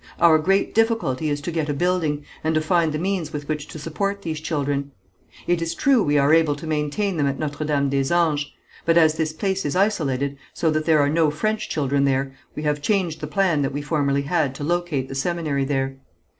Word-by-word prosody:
Our 160 -2 +6
great 195 +5 +1
difficulty 225 - +1
is 145 0 -2
to 175 - -4
get 160 -2 -2
a 145 - 0
building, 160 -3 0 0.2
and 160 0 +1
to 155 - +3
find 165 0 +2
the 150 - -2
means 180 -2 -2
with 145 -1 -6
which 150 -2 -3
to - - -9
support 200 +6 -3
these 160 -2 -3
children. 145 -3 -2 0.6
It 175 -1 +1
is 165 0 -2
true 270 -4 +3
we 145 -5 +2
are 140 +2 +4
able 160 -3 +4
to 145 - -9
maintain 160 +5 -1
them 145 -2 +2
at 140 0 -1
Notre 150 0 -3
Dame 140 -2 +1
des 135 +1 0
Anges; 155 -4 +1 0.3
but 165 0 +3
as 160 -2 +5
this 160 -1 -1
place 190 +4 -2
is 145 - -2
isolated, 140 -9 0 0.2
so 160 - +1
that 155 0 -1
there 155 -3 +4
are 145 - +2
no 160 0 +3
French 215 +8 -2
children 140 -1 +1
there, 135 0 0 0.2
we 150 - -5
have 150 -1 0
changed 180 -3 0
the 150 - -3
plan 170 -2 +1
that 135 0 -1
we 145 +1 -3
formerly 140 -2 0
had 145 -3 0
to 145 - -6
locate 170 -4 -1
the - - -7
seminary 150 -1 -1
there. 135 -1 -1
155 Hz, 225 wpm, -23 LUFS, 145-170 Hz, 0.6 s, Our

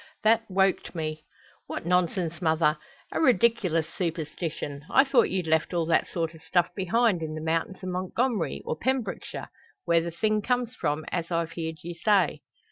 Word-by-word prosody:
That 225 +1 +5
woked 190 -1 +1
me." 155 -1 -4 0.4
"What - - -5
nonsense, 175 -1 +1
mother! 160 -2 +2 0.3
A - - -1
ridiklous 220 - +3
superstition! 160 -3 -4
I 270 - +6
thought 275 -1 +3
you'd 185 -2 -1
left 160 +2 +1
all 170 -1 +1
that 165 - +2
sort 165 -2 -2
o' 160 - -13
stuff 175 +2 +1
behind, 200 0 +2
in 155 -1 -4
the - - -4
mountains 165 +4 -2
o' - - -4
Montgomery, 185 +3 -1
or - - -1
Pembrokeshire, 245 +2 -2 0.4
where 170 -1 +4
the 170 - -3
thing 215 +5 0
comes 245 +1 0
from, 155 -7 -2
as 170 -2 -2
I've 165 -1 -1
heerd 160 -2 -5
you 175 +1 -5
say." 190 -1 +2
170 Hz, 170 wpm, -27 LUFS, 160-195 Hz, 0.4 s, I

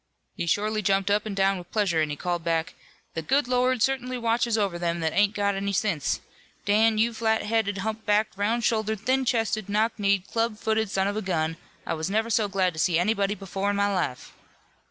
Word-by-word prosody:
He 170 - -3
shorely 215 +4 +1
jumped 195 0 +1
up 210 +1 +1
an' 205 - -4
down 195 -1 +2
with 175 0 -12
pleasure 195 -7 +1
an' 155 - 0
he 150 - -3
called 175 +2 -3
back: 165 -1 -1 0.4
'The 165 - -3
good 270 - +1
Lord 250 -1 +2
certainly 255 -1 0
watches 235 -1 +1
over 195 -5 0
them 170 0 -1
that 160 -1 0
ain't 205 +1 +3
got 200 0 +1
any 200 +1 -2
sense. 175 -6 0 0.4
Dan, 215 +2 +3
you 230 +2 +2
flat 220 -1 0
headed, 210 -2 0
hump 220 +2 -3
backed, 210 0 +1
round 220 +4 0
shouldered, 220 -2 0
thin 260 +3 +1
chested, 225 -4 0
knock 215 +3 +2
kneed, 200 -2 +2
club 225 0 -1
footed 220 -1 0
son 190 0 0
of 205 +1 -2
a - - -1
gun, 165 -4 -1 0.3
I - - -2
was 160 +2 -3
never 220 +3 0
so 215 -1 +2
glad 190 -2 0
to 160 - -7
see 165 0 +2
anybody 200 +2 +1
before 195 0 -3
in 205 - 0
my 200 0 +1
life.' 175 -9 -3
205 Hz, 215 wpm, -26 LUFS, 190-220 Hz, 0.4 s, ain't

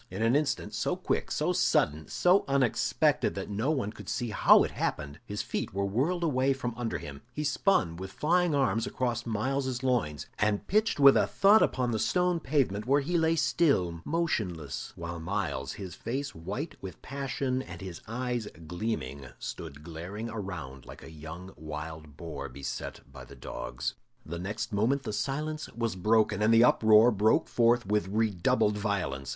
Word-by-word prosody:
In 110 - -3
an 115 +3 +3
instant 150 0 0
so - - 0
quick, - - -2
so - - 0
sudden, 75 +1 +2
so 180 +3 +3
unexpected 135 -4 +2
that - - -5
no 110 +8 0
one 130 -9 0
could - - -10
see 120 -2 -2
how - - +6
it - - -3
happened 75 +2 -3
his 105 +1 -3
feet - - -4
were 100 0 0
whirled 140 - 0
away 135 -3 +2
from 125 -3 -4
under 115 -7 -2
him, 75 -3 -9
he 150 +5 -4
spun 145 - +2
with 95 +1 -7
flying 170 - +2
arms 130 -5 +1
across 120 -2 -2
Myles's 130 +3 -1
loins, 110 - 0
and 105 -1 +1
pitched 215 -3 +1
with 140 -1 +8
a - - +3
thud 205 +2 +5
upon 125 -2 +1
the 110 - -1
stone 180 - +1
pavement, 130 -8 0
where 140 +2 +4
he 170 +6 -2
lay 165 -1 +3
still, 95 - +2
motionless, 105 - -2
while 85 0 -6
Myles, 90 -1 -2
his 95 -4 -7
face 135 +8 -4
white 100 - -5
with 95 -4 -8
passion 135 -1 -2
and - - -9
his 95 -4 -7
eyes 120 -1 -2 0.2
gleaming, 80 - -4
stood 70 +2 -7
glaring 90 +8 -6
around 80 - -6
like - - -11
a - - -10
young 80 +4 -9
wild 75 -1 -7
boar 75 -5 -6
beset 70 +2 -6
by 65 -2 -9
the - - -13
dogs. - - -5 0.3
The 85 +2 -5
next 105 +4 -4
moment 125 +7 +1
the 110 - -4
silence 150 +6 -2
was 115 -3 -1
broken, 105 +1 +2
and 110 +1 +4
the 115 0 +7
uproar 110 0 +6
broke 105 +1 +3
forth 120 0 +3
with 105 0 +1
redoubled 105 0 +1
violence. 90 -11 -2
110 Hz, 175 wpm, -29 LUFS, 85-135 Hz, 0.3 s, with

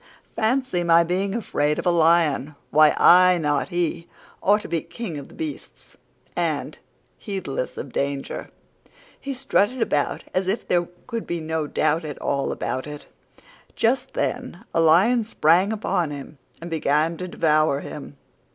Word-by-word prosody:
Fancy 225 -5 0
my 170 0 +5
being 190 +4 -1
afraid 150 -10 0
of - - -4
a 175 - +4
lion! 160 -3 +2 0.2
Why, 155 0 +5
I, 180 0 +7
not 150 -1 0
he, 175 -1 -2 0.3
ought 210 +2 +3
to - - -8
be 165 -2 -1
King 180 -8 -6
of 140 - -10
the - - -16
beasts"; 315 -2 -7 0.4
and, - - -2 0.4
heedless 190 - -4
of 135 - -7
danger, 140 0 -3 0.7
he 275 -1 -5
strutted 255 -2 +1
about 150 -10 0
as 185 0 0
if 195 +5 -2
there 175 -1 +1 0.2
could 230 -1 -5
be 175 - -2
no 160 -1 -2
doubt 160 +3 +1
at 150 -2 -6
all 140 0 -1
about 130 +3 -3
it. 150 0 -8 0.7
Just 255 +3 0
then 245 -5 -3
a 165 - +3
lion 190 +10 +4
sprang 185 -1 +3
upon 180 -6 -1
him 145 0 -9 0.2
and 170 0 -8
began 155 +1 +1
to 185 - -5
devour 155 -4 +2
him. 145 -1 -9
170 Hz, 155 wpm, -23 LUFS, 150-200 Hz, 0.7 s, I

